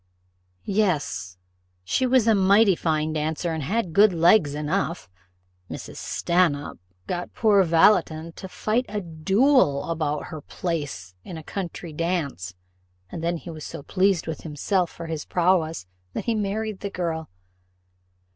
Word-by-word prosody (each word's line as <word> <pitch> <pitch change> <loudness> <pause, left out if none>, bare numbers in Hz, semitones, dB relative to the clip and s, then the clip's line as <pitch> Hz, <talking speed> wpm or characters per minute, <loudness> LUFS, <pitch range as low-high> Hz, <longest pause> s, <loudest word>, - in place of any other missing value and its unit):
"Yes: 150 - -1 0.5
she 255 - +1
was 250 -3 +3
a 225 - +6
mighty 200 0 +5
fine 155 -1 0
dancer, 160 +2 -1
and 160 - -3
had 185 +3 -1
good 205 +1 +6
legs 165 -3 +4
enough: 150 - -2 0.6
Mrs. - - -8
Stanhope 170 -5 0 0.3
got 175 - -4
poor 210 -3 +4
Valleton 165 -1 +3
to 190 - -8
fight 230 +7 -1
a 210 0 -2
duel 180 - +2
about 150 -2 -1
her 155 - -6
place 145 - -4
in 175 - -8
a 160 - -8
country 175 -2 -6
dance, 150 - -2 0.6
and 165 - -6
then 170 +1 0
he 170 - -9
was 155 -2 -8
so 140 - -7
pleased 190 0 +1
with 160 -2 -5
himself 170 +4 -1
for 170 - -9
his 160 -2 -4
prowess, 170 - +1 0.3
that - - -4
he 235 - +1
married 215 -1 -2
the 200 - -4
girl." 165 -4 -3
170 Hz, 145 wpm, -24 LUFS, 155-195 Hz, 0.6 s, a